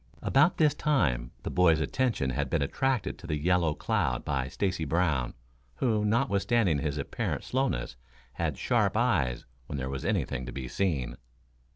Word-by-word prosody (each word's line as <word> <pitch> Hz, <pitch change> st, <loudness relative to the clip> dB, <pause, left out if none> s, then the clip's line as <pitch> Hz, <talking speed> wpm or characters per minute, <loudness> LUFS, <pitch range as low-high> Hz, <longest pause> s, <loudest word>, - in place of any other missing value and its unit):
About 150 Hz, +6 st, +4 dB
this 150 Hz, -2 st, +4 dB
time 65 Hz, -, +1 dB
the -, -, -3 dB
boys' 85 Hz, -3 st, +4 dB
attention 110 Hz, -, 0 dB
had 60 Hz, -, -1 dB
been -, -, +1 dB
attracted 130 Hz, -, -1 dB
to 90 Hz, -, -10 dB
the 75 Hz, -2 st, -1 dB
yellow 85 Hz, 0 st, +2 dB
cloud -, -, -1 dB
by 65 Hz, -3 st, -1 dB
Stacy 90 Hz, +3 st, -1 dB
Brown, 75 Hz, -5 st, 0 dB, 0.4 s
who, 110 Hz, -4 st, +1 dB
notwithstanding 105 Hz, -, +2 dB
his 75 Hz, -1 st, -2 dB
apparent 70 Hz, -, -3 dB
slowness, 130 Hz, -, -1 dB, 0.4 s
had -, -, -2 dB
sharp 110 Hz, -5 st, +1 dB
eyes 90 Hz, -, +1 dB, 0.2 s
when 70 Hz, -, -4 dB
there 65 Hz, 0 st, -3 dB
was 65 Hz, -1 st, -4 dB
anything 65 Hz, -, -1 dB
to -, -, -5 dB
be 65 Hz, -1 st, -5 dB
seen. 80 Hz, -7 st, -1 dB
90 Hz, 160 wpm, -29 LUFS, 70-115 Hz, 0.4 s, About